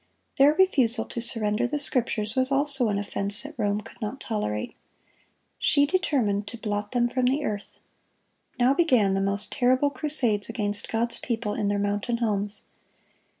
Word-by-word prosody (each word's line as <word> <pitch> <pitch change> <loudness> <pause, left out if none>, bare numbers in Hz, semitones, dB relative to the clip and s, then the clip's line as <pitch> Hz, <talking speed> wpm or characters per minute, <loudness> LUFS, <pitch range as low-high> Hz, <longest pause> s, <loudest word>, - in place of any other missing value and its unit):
Their 290 +2 +6
refusal 260 -12 +3
to 235 - -5
surrender 230 -1 +2
the 295 - -2
Scriptures 230 -6 -1
was 260 0 0
also 275 -4 +3
an 200 - 0
offense 200 +1 0
that 290 +2 -8
Rome 210 -3 -1
could - - -16
not 225 +5 -4
tolerate. 105 - -3 0.9
She 285 -1 +3
determined 255 - 0
to 235 - -7
blot 205 -2 -4
them 240 -1 +2
from 255 +1 -1
the 280 +3 0
earth. 205 -1 -5 0.8
Now 250 +2 +4
began 255 - +3
the 195 - 0
most 200 +2 -1
terrible 260 +2 +2
crusades 255 -7 0
against 205 -3 -3
God's 235 +1 -1
people 225 -3 -3
in 210 - -2
their 205 0 0
mountain 205 +3 -1
homes. 205 -3 -2
230 Hz, 160 wpm, -25 LUFS, 205-260 Hz, 0.9 s, Their